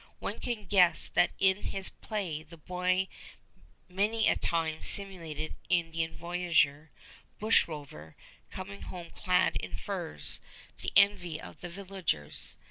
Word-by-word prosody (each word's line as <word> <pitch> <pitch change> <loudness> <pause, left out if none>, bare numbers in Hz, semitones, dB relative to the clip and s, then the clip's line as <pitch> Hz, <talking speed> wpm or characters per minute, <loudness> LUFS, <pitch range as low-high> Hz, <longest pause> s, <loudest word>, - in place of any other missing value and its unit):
One - - -4
can 230 -4 -3
guess 180 -3 +5
that 175 - +4
in 190 +1 +4
his 195 -1 -2
play 190 -8 -3
the 165 +2 -13
boy 180 +3 0 0.8
many 210 +4 +2
a - - +5
time 160 -2 0
simulated 165 -6 -2 0.2
Indian 165 -2 +1
voyageur, 165 -4 +2 0.5
bushrover, 145 - +1 0.3
coming 195 +2 -7
home 175 -2 -7
clad 180 0 +2
in 90 -1 -5
furs, 75 -3 -4 0.4
the - - -2
envy 195 -5 +5
of - - -10
the 175 - -5
villagers. 185 - -3
175 Hz, 125 wpm, -31 LUFS, 160-195 Hz, 0.8 s, guess